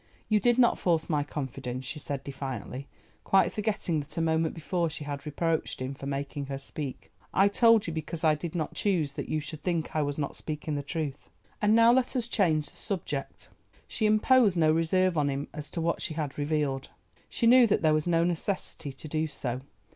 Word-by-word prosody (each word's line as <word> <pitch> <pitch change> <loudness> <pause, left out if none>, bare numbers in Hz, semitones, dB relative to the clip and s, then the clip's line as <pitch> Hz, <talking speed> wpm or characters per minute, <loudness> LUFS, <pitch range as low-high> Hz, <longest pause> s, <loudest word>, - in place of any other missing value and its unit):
"You 215 -1 +4
did 240 +3 +3
not 240 -2 +4
force 170 -1 +1
my 150 -1 +2
confidence," 130 -3 -5
she 150 +3 -5
said 140 -2 -4
defiantly, 135 -1 -6 0.4
quite 195 - +3
forgetting 205 -6 -1
that 145 +2 -8
a - - +1
moment 160 0 +1
before 170 +1 -1
she 155 -1 -6
had 145 0 -5
reproached 160 +2 -1
him 130 +1 -3
for 135 0 -8
making 140 0 -3
her 135 0 -3
speak. 140 0 -7 0.2
"I 195 - +6
told 230 +1 +5
you 165 - -3
because 160 +1 -4
I 155 -1 +5
did 155 +2 -5
not 160 -3 -2
choose 170 -9 0
that - - -5
you 155 - 0
should 150 +1 -7
think 170 -4 -2
I 155 - +2
was 145 -1 -2
not 140 -2 -3
speaking 155 0 -4
the 145 - -1
truth—and 155 +8 -2
now 230 +1 +7
let 260 +1 +1
us 240 -2 0
change 160 -10 +1
the - - -21
subject." 155 -9 -5 0.4
She 220 - 0
imposed 215 -2 +4
no 155 -2 +4
reserve 165 +2 +2
on 145 -1 +2
him 140 +1 -3
as 150 0 -6
to 170 - -4
what 170 +1 0
she 155 - -2
had 150 -4 -3
revealed; 145 -2 -1 0.4
she - - 0
knew 245 +1 +7
that 205 - +1
there 155 -1 +5
was 155 +2 +1
no 165 -1 +3
necessity 175 -3 -2
to 135 - -10
do 155 +1 -1
so. 130 -4 -4
155 Hz, 205 wpm, -28 LUFS, 145-185 Hz, 0.4 s, now